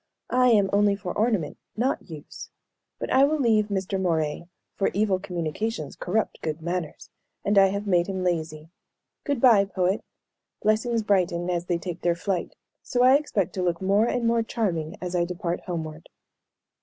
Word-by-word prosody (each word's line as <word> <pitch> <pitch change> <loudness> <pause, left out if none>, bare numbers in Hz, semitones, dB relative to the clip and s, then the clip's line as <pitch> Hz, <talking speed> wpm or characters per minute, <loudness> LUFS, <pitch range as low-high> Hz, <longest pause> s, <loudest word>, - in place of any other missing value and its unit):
"I 250 0 +5
am 210 -5 +5
only 205 0 +4
for 195 -3 -6
ornament, 215 -8 0 0.2
not 250 -3 -1
use. 155 -2 -9 0.5
But - - -5
I 265 - +6
will 305 +2 +3
leave 220 -5 +3
Mr. 195 -1 -2
Moray, 160 -3 -1 0.3
for 195 - 0
'evil 200 -2 +2
communications 175 0 -3
corrupt 215 +4 -2
good 155 0 -3
manners,' 170 -1 -4 0.3
and 205 - +2
I 195 -1 +7
have 200 +2 -3
made 175 -3 +2
him 190 -2 -3
lazy. 160 -2 -2 0.5
Good 285 -4 0
bye, 230 -6 +6
poet. 190 0 -1 0.6
'Blessings 220 +2 +1
brighten 180 -3 +1
as 175 -1 -2
they 175 -1 0
take 175 0 -6
their 175 -1 +2
flight;' 180 0 -3 0.3
so 245 -1 0
I 255 +1 +7
expect 260 - +1
to 185 - -3
look 175 -2 0
more 200 +4 +2
and 240 -1 -1
more 230 0 +3
charming 180 -9 -2
as 180 0 -4
I 175 - +2
depart 175 0 -3
homeward." 160 -3 -5
190 Hz, 170 wpm, -25 LUFS, 170-215 Hz, 0.6 s, I